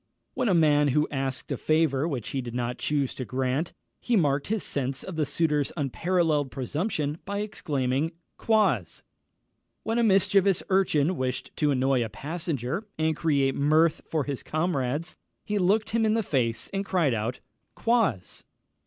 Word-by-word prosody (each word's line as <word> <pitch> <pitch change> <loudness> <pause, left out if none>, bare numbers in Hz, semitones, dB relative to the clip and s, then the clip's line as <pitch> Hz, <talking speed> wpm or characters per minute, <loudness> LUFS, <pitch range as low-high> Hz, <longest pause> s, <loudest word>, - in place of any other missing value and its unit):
When 245 - 0
a 185 - +4
man 150 -3 +4
was 150 +3 +3
asked 135 -2 -3
a - - -1
favour 155 -2 +2
which 130 -9 -4
he 135 - -2
did 120 -1 -7
not 125 0 -2
choose 145 -3 0
to 130 - -5
grant, 130 +5 -1 0.3
he 240 - 0
marked 145 -6 +2
his 220 -1 -1
sense 135 -1 -2
of 190 - -7
the 155 -2 0
suitor's 150 -1 +1
unparalleled 155 0 +1
presumption 150 - -2
by 200 +1 -3
exclaiming 145 -6 -1 0.2
Quoz! 195 - +1 0.8
When 225 +2 0
a - - +3
mischievous 195 -2 +3
urchin 185 -3 +2
wished 130 -1 -3
to 150 - +2
annoy 130 -2 +2
a 110 - -4
passenger, 155 - -4
and 160 0 +1
create 140 -4 +1
mirth 155 +4 +3
for 155 -3 0
his 140 -1 -4
comrades, 155 -1 -2 0.3
he 210 -1 -1
looked 210 +4 +2
him 230 +1 +2
in 220 0 +3
the 225 - +1
face, 120 - -1
and 195 0 -1
cried 175 -9 +1
out 115 +3 -2 0.4
_Quoz! 225 - 0
150 Hz, 160 wpm, -27 LUFS, 135-185 Hz, 0.8 s, a